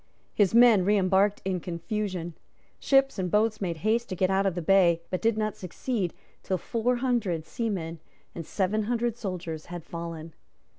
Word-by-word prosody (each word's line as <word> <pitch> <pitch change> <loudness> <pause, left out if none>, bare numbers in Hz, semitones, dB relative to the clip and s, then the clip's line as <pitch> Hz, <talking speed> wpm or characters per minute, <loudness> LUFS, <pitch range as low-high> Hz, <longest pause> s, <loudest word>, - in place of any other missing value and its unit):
His 205 0 +2
men 235 -5 +7
reembarked 195 0 +2
in 190 -1 -1
confusion. 175 0 -4 0.5
Ships 270 -4 +3
and 180 -1 -1
boats 215 +2 +1
made 170 -4 -2
haste 230 +2 +1
to 185 - -3
get 185 +1 +1
out 195 +1 +2
of 185 - -1
the 175 - -2
bay, 170 -2 +4
but 185 - -2
did 225 -1 +2
not 215 -1 -1
succeed 185 +1 -3 0.3
till 190 - -1
four 235 +6 -1
hundred 235 -10 -1
seamen 175 -8 -3 0.3
and 170 - -6
seven 205 +5 -1
hundred 240 0 0
soldiers 180 -8 -5
had 175 -1 -7
fallen. 165 -1 -7
195 Hz, 165 wpm, -27 LUFS, 175-220 Hz, 0.5 s, men